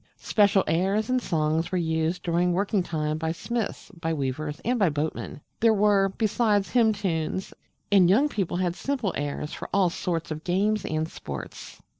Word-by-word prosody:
Special 200 -2 +3
airs 195 +8 +1
and 255 0 +2
songs 160 -2 0
were 185 - +1
used 160 +1 -1
during 175 +1 +1
working 200 +2 +1
time 155 -3 -2
by 160 0 -1
smiths, 220 +4 -4
by 165 -4 -4
weavers, 145 +2 -3
and 245 +1 +1
by 195 -5 +4
boatmen. 150 0 -4 0.2
There 225 -1 +4
were, 200 -1 +3
besides, 210 0 +1
hymn 230 -3 +4
tunes; 185 -3 -2 0.4
and 190 -3 +6
young 250 +10 +5
people 195 - -2
had 175 -1 0
simple 255 -7 -2
airs 145 +1 -3
for - - -7
all 190 -3 +3
sorts 170 -2 -3
of 155 +1 -5
games 200 +3 +1
and 155 0 -1
sports. - - -8
180 Hz, 170 wpm, -26 LUFS, 160-205 Hz, 0.4 s, and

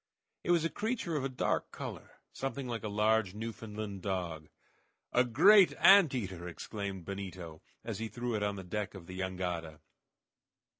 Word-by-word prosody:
It - - -5
was 170 -2 +4
a - - +1
creature 210 -6 -2
of 145 - 0
a 135 - -1
dark 130 - -1
color, - - -7 0.2
something 135 0 -4
like 115 -3 -3
a - - -4
large 105 -1 +2
Newfoundland 105 -2 -6
dog. 85 -5 -3 0.6
"A 125 - +5
great 180 - +6
ant 190 -8 +7
eater!" 95 -7 -4
exclaimed 95 +1 -5
Benito, 90 -5 -6 0.2
as - - -4
he 115 - -2
threw 120 +1 -3
it 105 - -1
on 105 0 0
the 95 - -7
deck 105 +3 -4
of 90 -3 -9
the 95 +2 -8
jangada. 90 -4 -3
105 Hz, 165 wpm, -32 LUFS, 95-125 Hz, 0.6 s, ant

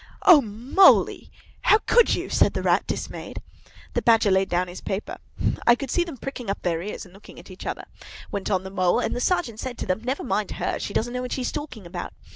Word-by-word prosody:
'" - - -34
"O 295 - +5
Moly, 240 - +3 0.3
how 430 - +5
could 480 -1 +4
you?" - - -4
said - - +2
the - - -2
Rat, - - +2
dismayed. - - -5 0.5
The - - 0
Badger 225 -3 +4
laid 190 0 +2
down 180 +1 0
his 175 +1 -9
paper. 195 +2 -4 0.5
"I 240 - +8
could 265 0 -6
see 350 - +2
them 330 -6 -8
pricking 250 -3 -6
up 195 - -3
their 170 -2 0
ears 205 +2 -6
and 180 - -17
looking 195 - -15
at - - -13
each 185 - -9
other," - - -4 0.5
went 200 -1 -3
on 190 -2 +1
the 190 - -8
Mole; 185 -2 +2
"and - - -1
the 245 - -3
Sergeant 280 -10 0
said 250 -1 -5
to - - -4
them, 185 +3 -1
'Never 260 +3 -2
mind 210 -5 -1
her; - - -2
she 200 - -5
doesn't 240 +2 -1
know 250 - -2
what 250 - -4
she's 255 -2 -2
talking 290 -9 -7
about. 175 +1 -6
220 Hz, 240 wpm, -24 LUFS, 190-260 Hz, 0.5 s, I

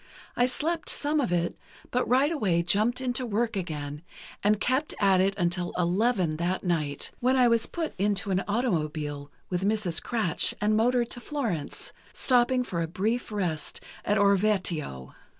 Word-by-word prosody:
I 245 - +3
slept 325 +6 -1
some 295 +1 0
of 245 - -1
it, 175 -1 0 0.4
but 250 - 0
right 265 +5 +4
away 190 - +1
jumped 215 +8 +1
into 255 0 0
work 230 0 -1
again, 150 -5 -4 0.4
and 210 0 +3
kept 260 +6 0
at 195 -2 +4
it 195 +1 +1
until 175 -1 0
eleven 180 -2 +1
that 175 +3 -1
night, 155 -6 -1
when 255 +2 +2
I 250 -2 +5
was 230 -1 +2
put 330 -2 -3
into 200 0 0
an 190 +1 +1
automobile 155 - -1 0.2
with 180 +1 -1
Mrs. 205 -4 0
Kratsch 220 -9 0
and 210 +1 +2
motored 240 +2 +2
to - - -2
Florence, 235 - -4 0.2
stopping 250 0 +3
for 170 -8 -3
a 165 - -1
brief 220 +8 -2
rest 175 -7 -2 0.2
at 205 - +1
Orvieto. 185 - +1
205 Hz, 160 wpm, -27 LUFS, 175-245 Hz, 0.4 s, I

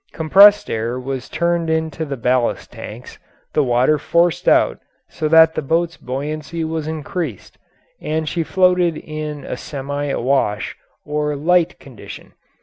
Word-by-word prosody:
Compressed 200 +6 +6
air 115 +3 -2
was 130 0 -5
turned 170 -1 0
into 160 0 -1
the 140 -2 -5
ballast 125 0 0
tanks, - - -10 0.3
the 150 - +3
water 130 +4 +2
forced 170 +2 +1
out - - +3 0.3
so 155 - -3
that 160 +1 +6
the - - -2
boat's 165 +4 0
buoyancy 150 +5 -5
was 160 -1 -3
increased, 155 - -5 0.4
and 155 +1 -2
she 170 - -1
floated 180 -1 +2
in 155 -1 -6
a - - -4
semi 145 +2 -5
awash, 130 -6 0 0.3
or 150 0 -1
light, 175 +3 +1
condition. 130 -5 -12
155 Hz, 140 wpm, -19 LUFS, 135-165 Hz, 0.4 s, Compressed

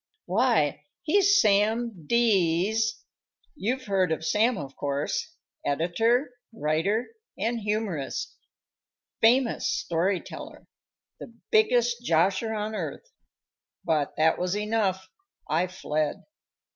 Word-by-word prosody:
"Why, 185 - +1 0.2
he's 405 +5 +4
Sam 210 - +1
D 195 -6 +3
s; 220 0 -1 0.5
you've 260 0 -2
heard 190 -4 +1
of 160 0 -2
Sam, 225 +5 +2
of 140 -2 -7
course 140 0 -3 0.3
editor, 225 - +1 0.2
writer 200 +4 0 0.3
and 235 +1 -1
humorist 210 -9 -3 0.9
famous 240 +2 +3
story 180 +3 0
teller - - -10 0.5
the - - -9 0.2
biggest 245 - +3
'josher' 190 +4 +2
on 215 +1 -3
earth 215 - -5 0.4
." - - -47
But 150 -3 0
that 160 +1 +3
was 180 +2 -1
enough. 210 -3 -1 0.4
I 170 +4 +1
fled. 155 -4 -2
205 Hz, 105 wpm, -26 LUFS, 165-235 Hz, 0.9 s, he's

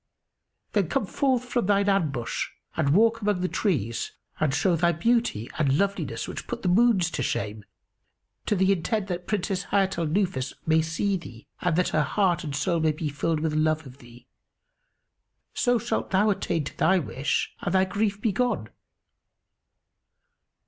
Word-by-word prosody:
Then 195 -6 +1
come 270 -6 0
forth 255 +3 0
from 240 -4 -1
thine 200 0 +3
ambush 155 -12 0 0.3
and 140 - +1
walk 225 +8 +4
among 205 -3 0
the 185 - +1
trees 125 - -1 0.3
and 155 -3 +2
show 160 +5 +2
thy 170 +1 +2
beauty 225 - +1
and 140 -2 +3
loveliness 200 +2 -1
which - - -7
put 240 -1 -5
the 180 - +2
moons 190 -3 +4
to - - -3
shame, 105 -3 -2 0.8
to 210 - +2
the 190 0 +3
intent 195 +3 0
that 175 0 -4
Princess 195 -2 -1
Hayat 195 -3 +1
al 165 - 0
Nufus 170 -6 -1
may 160 0 +4
see 180 +5 0
thee 120 -9 -12 0.2
and 180 -3 +1
that 180 +1 +2
her 155 - +2
heart 175 +4 +1
and 145 -3 -4
soul 165 +4 0
may 155 -1 +2
be 155 0 -3
filled 150 +2 -1
with 160 -1 0
love 155 0 +1
of 130 +1 -13
thee; 120 -1 -15 1.3
so 245 -1 +2
shalt 225 - -2
thou 205 +2 +3
attain 170 -5 -1
to 145 - -7
thy 190 - +4
wish 140 -4 -1
and 175 - -2
thy 190 0 +4
grief 200 +1 -1
be 220 0 +1
gone." 215 - -1
180 Hz, 170 wpm, -26 LUFS, 155-205 Hz, 1.3 s, walk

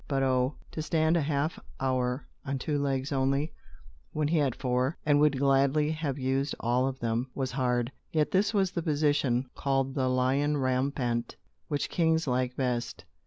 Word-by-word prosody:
But 135 -1 0
oh, 130 +1 +1 0.2
to 155 - -4
stand 160 +1 +2
a 170 - +3
half 145 +2 -1 0.2
hour 130 0 0 0.2
on 140 -1 -2
two 145 +3 -1
legs 135 0 -1
only, 140 +3 0 0.6
when 150 -1 0
he 165 - +2
had 135 -5 +1
four, 125 +2 0
and 145 -1 +4
would 150 -2 +4
gladly 140 +2 +3
have 155 -4 -2
used 135 +1 0
all 125 +2 +1
of 135 0 -4
them, 115 +2 -1
was 130 -2 -2
hard. 125 -1 0 0.2
Yet 155 -2 +1
this 200 +2 +2
was 195 -4 +1
the 175 - -2
position, 145 -5 +1
called 135 -1 0
"the 130 -2 0
lion 130 +4 +2
rampant," 130 -3 -1 0.3
which 145 -2 -2
kings 160 -1 +2
liked 125 -1 -1
best. 125 -3 -2
135 Hz, 170 wpm, -29 LUFS, 130-150 Hz, 0.6 s, and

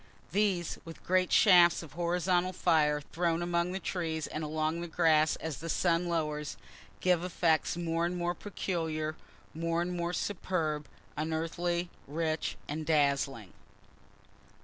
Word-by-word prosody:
These, 190 -3 0
with 165 -1 -11
great 185 0 +2
shafts 175 -5 +6
of 150 -3 -12
horizontal 175 +2 +1
fire 150 -4 +2
thrown 170 +2 -1
among 175 0 0
the 190 - -3
trees 160 -5 -2
and 155 - -5
along 155 +2 -1
the 175 - -4
grass 160 -2 +3
as 160 -3 -5
the 165 - -6
sun 175 +1 +2
lowers, 150 -3 -2 0.4
give 180 -2 +3
effects 170 -2 +1
more 165 -1 -1
and 180 +1 -3
more 175 0 0
peculiar, 160 -5 -3 0.4
more 165 +1 -1
and 175 +1 -1
more 170 0 -1
superb, 165 -6 -2 0.3
unearthly, 165 +2 -1 0.2
rich 155 +1 -2
and 155 +2 -3
dazzling. 140 - +1
165 Hz, 135 wpm, -31 LUFS, 155-175 Hz, 0.4 s, shafts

